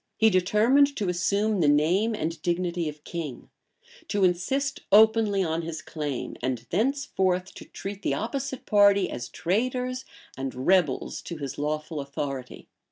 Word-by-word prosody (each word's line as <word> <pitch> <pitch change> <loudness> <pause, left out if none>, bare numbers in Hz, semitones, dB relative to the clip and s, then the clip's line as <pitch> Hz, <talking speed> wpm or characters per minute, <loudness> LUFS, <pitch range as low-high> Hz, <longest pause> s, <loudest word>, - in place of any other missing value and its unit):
He 220 0 +5
determined 225 +10 +4
to 200 -4 -1
assume 200 +4 +1
the 155 - +3
name 175 +10 +3
and 165 -3 -3
dignity 175 -2 -1
of 150 0 -11
king; 160 -7 -6 0.6
to 200 -2 0
insist 265 +11 +1
openly 215 -2 +5
on 165 -1 -1
his 160 -1 -6
claim; 150 -6 -4
and 125 -2 -2
thenceforth 190 -5 0
to - - -11
treat 200 0 -7
the - - 0
opposite 265 +3 -4
party 200 -2 +4
as 120 0 -5
traitors 250 - -1 0.3
and 135 -1 -4
rebels 180 -8 +2
to 170 - -7
his 140 -2 -6
lawful 155 +1 -2
authority. 140 -2 -6
185 Hz, 145 wpm, -26 LUFS, 155-220 Hz, 0.6 s, He